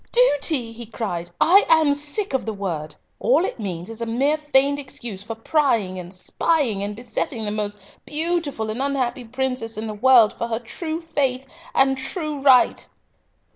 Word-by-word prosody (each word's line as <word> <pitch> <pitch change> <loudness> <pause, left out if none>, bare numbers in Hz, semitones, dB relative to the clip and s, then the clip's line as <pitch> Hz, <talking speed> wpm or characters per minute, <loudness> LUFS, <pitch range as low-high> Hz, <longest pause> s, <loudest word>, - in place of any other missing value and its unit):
duty!" 290 - +3
he 230 0 -8
cried. 190 -7 -4
"I 390 +5 +6
am 315 -3 +5
sick 295 +6 -2
of 265 - -1
the 220 - -2
word. 160 -6 -4 0.2
All 480 -7 +3
it - - -5
means 180 -4 -4
is 225 0 -6
a 230 - -2
mere 270 +6 +1
feigned 285 -2 +2
excuse 235 -7 -6
for 225 +2 -6
prying 225 -7 0
and 175 0 -9
spying, 225 - 0
and 205 +1 -4
besetting 230 0 -3
the 205 - -2
most 205 -1 -3 0.2
beautiful 300 -8 -1
and 230 +4 -4
unhappy 260 -3 -1
princess 250 -2 -3
in 220 - -3
the 215 - -4
world 235 0 +5
for 235 - -4
her 225 -1 -2
true 315 +8 -5
faith 275 -5 -1 0.3
and 270 0 +3
true 300 +1 -4
right!" 265 -3 +4
250 Hz, 175 wpm, -22 LUFS, 220-290 Hz, 0.3 s, I